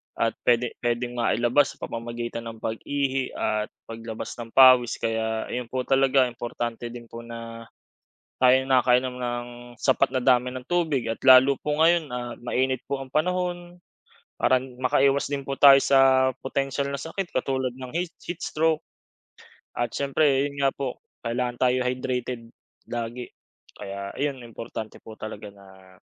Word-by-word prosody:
at 115 - +1
puwede 120 0 +2
puwedeng 120 0 -2
mailabas 120 +4 +2
sa - - -26
pamamagitan 120 0 -5
ng 115 -1 -9
pag-ihi 135 +3 -2
at 105 0 -1 0.2
paglabas 115 -1 -7
ng 115 -1 -7
pawis. 130 -3 +7
Kaya 110 0 -1
ayon 125 -1 -3
po 130 +1 -2
talaga, 135 0 +3
importante 120 0 -5
din 120 -1 -10
po 115 - -8
na 115 0 -8 0.8
tayo'y 130 +1 +5
nakakainom 125 -1 +3
ng 120 -1 -3 0.3
sapat 135 0 +2
na 130 - +1
dami 125 -1 +4
ng 130 -1 -7
tubig 160 -7 0
at 115 - -3
lalo 130 +1 +7
po 150 0 -1
ngayon 165 +1 +4
at 120 -1 -5
mainit 130 +1 0
po 140 - 0
ang 135 - -7
panahon, 175 +1 -1 0.6
parang 130 0 +3 0.2
makaiwas 135 +2 +3
din 140 -1 -3
po 140 - -3
tayo 140 -1 +9
sa 130 -1 +5
potensiyal 135 +1 -2
na 140 - -3
sakit 175 +5 -4
katulad 130 -1 -1
ng 130 -1 -8
hate 175 0 -2
heat 175 0 -6
stroke. 160 0 +1 1.0
At 120 - -1
siyempre 140 0 +2
yun 140 - -13
nga 135 - +3
po, 135 -3 -4 0.3
kailangan 120 +1 -2
tayo 125 0 +3
hydrated 125 -2 -3 0.4
lagi, 120 +1 -4 0.5
kaya 100 0 -6
ayun 140 -1 -2
importante 110 -1 -7
po 110 - -11
talaga 105 -1 -7
na 95 -1 -18
125 Hz, 150 wpm, -25 LUFS, 120-135 Hz, 1.0 s, tayo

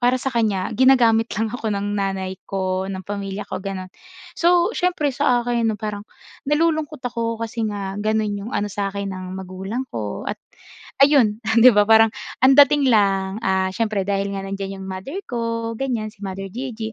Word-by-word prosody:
para 245 +1 +3
sa 265 +1 -3
kanya, 215 -4 0
ginagamit 235 -3 +4
lang 220 0 -1
ako 235 -3 -3
ng 205 0 -2
nanay 190 -1 -2 0.2
ko, 190 -1 -2
ng 190 -2 -5
pamilya 200 0 -5
ko - - -4
gano'n. 190 -1 -6 0.4
So, 345 0 +3
siyempre, 345 -6 0
sa 240 -1 +2
akin 235 -2 +1
'no, 215 - -1
parang 210 0 -4 0.5
nalulungkot 310 -1 +1
ako 230 -1 -2
kasi 230 0 -4
nga 200 -2 -4
gano'n 215 0 0
'yong 220 +6 -7
ano 205 0 -1
sa 200 -1 -1
akin 200 0 -4
ng 185 0 -6
magulang 190 +7 -5
ko. 105 -3 -4
At - - -4 0.6
ayun, 240 -6 +3 0.2
di 255 - +10
ba, 205 0 +4
parang 225 +1 +6 0.3
ang 265 +1 +6
dating 285 -1 +6
lang, 195 -3 +2
ah, 190 0 +1
siyempre 215 -3 0
dahil 200 0 0
nga 195 0 -4
nandiyan 195 0 -5
'yong 190 - -7
mother 195 - -6
ko, 230 -1 -2
ganyan. 235 -4 -2
Si 205 -2 -11
Mother 195 0 -5
Gigi, 225 0 -5
215 Hz, 180 wpm, -21 LUFS, 195-245 Hz, 0.6 s, di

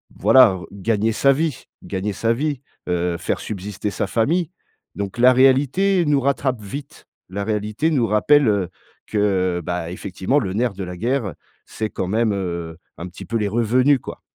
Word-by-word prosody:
voilà 115 -8 +6
gagner 105 +2 0
sa 135 +5 +3
vie, 150 -2 -2 0.2
gagner 100 +1 -3
sa 115 +4 0
vie, 145 +1 -2 0.3
heu, 90 -1 0
faire 85 - -2
subsister 105 0 -5
sa 100 - -2
famille. 155 - +1 0.5
Donc 100 +1 -5
la 125 +1 +6
réalité 145 +9 +3
nous 145 -2 +3
rattrape 130 -3 0
vite, 135 +8 -8 0.2
la 100 +2 -3
réalité 105 +7 -1
nous 125 -7 +2
rappelle, 135 +7 +4
heu, 100 -4 +1 0.4
que 95 -4 +1
bah, 85 0 -3
effectivement 95 +8 -1
le 95 -9 -3
nerf 115 +1 0
de 100 0 -6
la 90 0 -6
guerre, 115 - -1 0.3
c'est 110 -1 -4
quand 90 - -3
même, 110 +3 +1
heu, 85 -4 -4 0.2
un 85 - -6
petit 90 - -10
peu 115 - -5
les 105 -2 0
revenus 125 +5 +3
quoi. - - -9
110 Hz, 170 wpm, -21 LUFS, 95-130 Hz, 0.5 s, voilà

